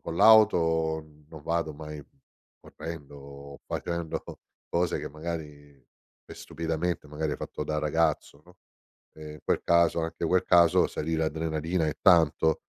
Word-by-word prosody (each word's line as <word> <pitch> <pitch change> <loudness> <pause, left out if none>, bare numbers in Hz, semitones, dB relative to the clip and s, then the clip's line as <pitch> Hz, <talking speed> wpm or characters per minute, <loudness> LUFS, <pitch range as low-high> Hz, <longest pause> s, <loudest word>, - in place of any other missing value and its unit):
con 85 - -5
l'auto 80 -7 +4 0.2
non 80 -2 -11
vado 80 -1 -2
mai 75 0 -8 0.6
correndo 75 -4 -9
o 70 0 -11
facendo 85 -2 -4 0.5
cose 85 0 0
che - - -5
magari 75 -3 -8 0.4
e - - -10
stupidamente, 80 0 -3
magari 75 0 -3
ho - - -3
fatto 75 - -6
da 75 0 -2
ragazzo, 75 -1 -1
no, 90 +1 -20 0.6
e 75 -1 -9
in - - -12
quel - - +1
caso, 85 0 +3
anche 80 +1 -3
quel 95 +2 +2
caso, 85 -2 +5
salì 80 +2 -3
l'adrenalina 80 +1 -1
e 75 - -3
tanto 80 -3 +4
80 Hz, 140 wpm, -27 LUFS, 75-85 Hz, 0.6 s, caso